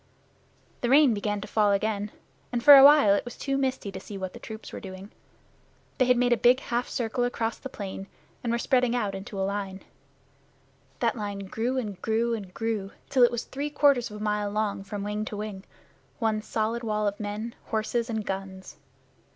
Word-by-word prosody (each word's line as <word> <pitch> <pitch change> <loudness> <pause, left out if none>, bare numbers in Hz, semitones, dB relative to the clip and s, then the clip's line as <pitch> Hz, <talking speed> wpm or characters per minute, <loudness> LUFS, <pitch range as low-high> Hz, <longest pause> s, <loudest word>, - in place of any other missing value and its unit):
The 240 - 0
rain 275 -2 +6
began 205 0 -2
to 210 - -7
fall 210 -1 +2
again, 205 +1 0 0.4
and 240 -1 -2
for 290 +2 +11
a 270 - +10
while 285 -7 +8
it 200 - +1
was 245 - -9
too 275 -1 -2
misty 260 -6 -1
to 190 - -7
see 200 +1 -8
what 190 -1 -5
the - - -10
troops 220 -1 -9
were - - -5
doing. 190 +1 -9 0.9
They 255 - +5
had 250 0 +4
made 245 0 +3
a - - +2
big 245 +3 +5
half 245 -2 -2
circle 240 +1 -1
across 235 -2 -2
the 265 - -7
plain, 195 -4 -7 0.4
and 235 - -1
were 235 - +1
spreading 250 -1 +2
out 210 -5 -1
into 195 +1 -6
a 190 - +1
line. 195 -1 -4 1.2
That - - +2
line 205 -3 -4
grew 235 +7 -2
and 210 -7 -4
grew 230 +1 +1
and 200 -5 -5
grew 215 -2 -3 0.2
till 260 - +3
it 240 - +8
was 240 -1 -2
three 285 +2 -4
quarters 280 -5 +3
of 210 0 -8
a - - -5
mile 210 -1 0
long 205 -1 -2
from 200 0 -5
wing 210 +1 -2
to 210 - -6
wing 205 -2 -6 0.5
one 220 -2 0
solid 220 +2 -2
wall 215 -2 -1
of 205 0 -2
men, 210 +2 -4
horses, 225 +2 -1
and 220 -2 -2
guns. 190 -1 -6
220 Hz, 205 wpm, -27 LUFS, 205-240 Hz, 1.2 s, for